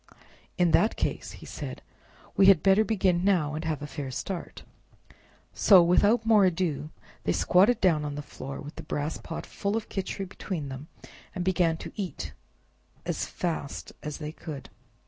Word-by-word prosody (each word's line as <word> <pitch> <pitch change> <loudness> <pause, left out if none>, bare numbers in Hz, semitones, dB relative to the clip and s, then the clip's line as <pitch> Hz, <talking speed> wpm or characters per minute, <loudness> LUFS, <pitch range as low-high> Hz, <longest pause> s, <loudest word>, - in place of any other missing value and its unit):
"In 175 -2 +3
that 215 +7 +4
case," - - -2
he - - -11
said, - - -7 0.5
"we 195 - +6
had 190 -6 +7
better 195 +2 +5
begin 190 -4 +1
now, 175 -7 +2
and 155 +2 -4
have 155 -3 -2
a - - -3
fair 145 -2 -5
start." 175 +7 -5 0.9
So 190 -4 +7
without 205 +7 +4
more 220 -3 +6
ado 165 -5 0 0.3
they - - +1
squatted 205 +6 +4
down 165 -6 +3
on 145 -1 -4
the 145 - -5
floor, 135 -1 -7
with 150 +2 -10
the - - -5
brass 150 0 -3
pot 165 - -6
full 200 +2 -2
of 225 - -5
Khichri 195 0 -3
between 175 -6 -5
them, 135 +3 -7 0.5
and 180 -2 -2
began 175 -3 +2
to - - -8
eat 170 - -5 0.7
as - - -2
fast 160 -5 -4
as 150 -1 -5
they 150 -1 -5
could. 155 -4 -8
175 Hz, 170 wpm, -28 LUFS, 150-195 Hz, 0.9 s, had